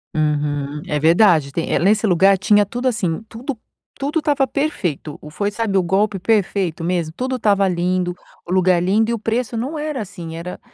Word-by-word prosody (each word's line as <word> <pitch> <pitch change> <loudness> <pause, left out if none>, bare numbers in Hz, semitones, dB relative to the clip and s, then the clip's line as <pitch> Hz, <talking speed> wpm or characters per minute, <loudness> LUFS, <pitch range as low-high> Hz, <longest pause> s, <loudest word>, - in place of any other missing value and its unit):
Uhum. 150 -1 -1
É 150 -3 -1
verdade, 160 -2 +4
tem 165 +4 -1
nesse 210 +5 +3
lugar 195 +1 +4
tinha 205 +2 +4
tudo 245 +5 -3
assim, 215 -6 -1
tudo, 240 +4 -6 0.4
tudo 290 +4 -1
estava 290 -3 +1
perfeito, 185 - -3
foi 205 +6 -1
sabe 210 -1 -2
o 190 - +5
golpe 195 +2 0
perfeito 195 -5 0
mesmo, 170 -2 -1
tudo 255 0 -2
estava 200 -3 +2
lindo, 180 0 0 0.3
o - - -6
lugar 185 -1 +3
lindo, 210 +5 +2
e - - +1
o - - -1
preço 230 +2 -2
não 270 +8 -3
era 300 -2 -3
assim, 175 -5 -8
era 175 +2 -7
195 Hz, 180 wpm, -20 LUFS, 170-225 Hz, 0.4 s, o